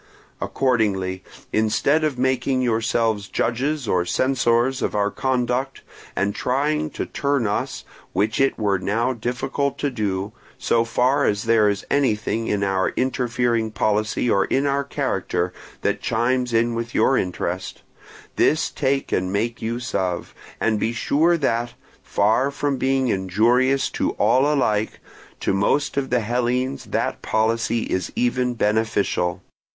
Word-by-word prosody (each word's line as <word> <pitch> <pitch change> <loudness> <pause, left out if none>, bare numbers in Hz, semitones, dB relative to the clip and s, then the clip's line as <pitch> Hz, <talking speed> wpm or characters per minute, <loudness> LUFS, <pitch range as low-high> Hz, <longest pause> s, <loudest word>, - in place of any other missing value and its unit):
Accordingly, 100 -8 0 0.3
instead 110 +8 +2
of 150 -4 0
making 130 0 +1
yourselves 115 -3 0
judges 135 +5 -1
or 90 -3 +2
censors 130 +4 +1
of - - -1
our 105 0 +1
conduct, 130 +1 -1 0.3
and 100 +1 0
trying 150 +6 0
to - - -4
turn 140 -4 0
us, 105 - -2 0.3
which 110 +5 0
it 135 - +2
were 100 -3 +1
now 115 +7 0
difficult 125 +4 -2
to 145 - -1
do, 100 -4 -2 0.3
so 115 - +2
far 130 +4 +2
as 105 0 +1
there 115 -2 +4
is 100 -1 -3
anything 115 -4 +1
in 100 -1 0
our 95 -1 +1
interfering 120 -3 0
policy 110 +2 0
or 100 -4 +3
in 135 +2 0
our 140 0 +1
character 90 -9 -2 0.3
that - - 0
chimes 125 +2 0
in 115 +1 +2
with 115 +1 -4
your 135 - +4
interest, 90 -1 -3 0.5
this 155 - +2
take 135 -1 -1
and 90 0 0
make 115 +4 -1
use 120 +3 -4
of; 90 -2 -2 0.3
and 110 -2 +1
be 115 +3 0
sure 160 +8 +2
that, 120 -5 -1 0.3
far 110 +7 +2
from 140 -1 -1
being 130 0 +1
injurious 115 +8 +2
to - - -1
all 130 +7 +3
alike, 110 -7 0 0.4
to - - 0
most 120 +9 +1
of 140 -1 -1
the 125 -1 +2
Hellenes 125 +3 -1
that - - -2
policy 115 +1 0
is 95 -2 -2
even 125 0 0
beneficial. 105 -5 0
120 Hz, 140 wpm, -22 LUFS, 105-130 Hz, 0.5 s, there